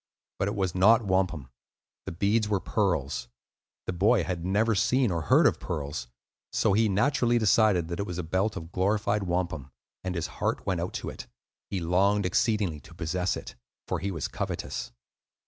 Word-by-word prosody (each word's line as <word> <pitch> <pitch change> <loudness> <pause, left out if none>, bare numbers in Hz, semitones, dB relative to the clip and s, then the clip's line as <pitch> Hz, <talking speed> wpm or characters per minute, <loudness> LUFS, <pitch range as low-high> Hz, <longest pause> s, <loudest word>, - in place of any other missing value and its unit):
But 100 - +1
it 100 - -2
was 95 -3 -1
not 110 +5 +5
wampum; 90 -8 0 0.6
the - - -2
beads 105 +5 +1
were 100 -2 +1
pearls. 75 - -1 0.6
The - - -2
boy 100 +3 +3
had 85 -1 -3
never 105 +5 +2
seen 125 +3 +2
or 85 -1 -1
heard 75 - +4
of - - +3
pearls, 70 -3 -4 0.4
so - - +2
he 110 +1 +3
naturally 120 +3 +2
decided 105 -5 +3
that 85 - -4
it 100 - -2
was 90 - -5
a 90 - -2
belt 95 +6 0
of 80 +1 -8
glorified 105 +3 +1
wampum, 85 -6 -2 0.3
and 95 -1 -3
his 85 -2 -1 0.2
heart - - -1
went 90 -3 0
out 90 - -4
to - - -4
it; - - -9 0.4
he 95 - -2
longed 95 +4 +2
exceedingly 95 -3 +1
to 85 +3 -16
possess 90 +2 -1
it, - - -8 0.3
for - - -1
he 100 - -2
was 80 -8 -3
covetous. - - -4
95 Hz, 180 wpm, -28 LUFS, 85-105 Hz, 0.6 s, not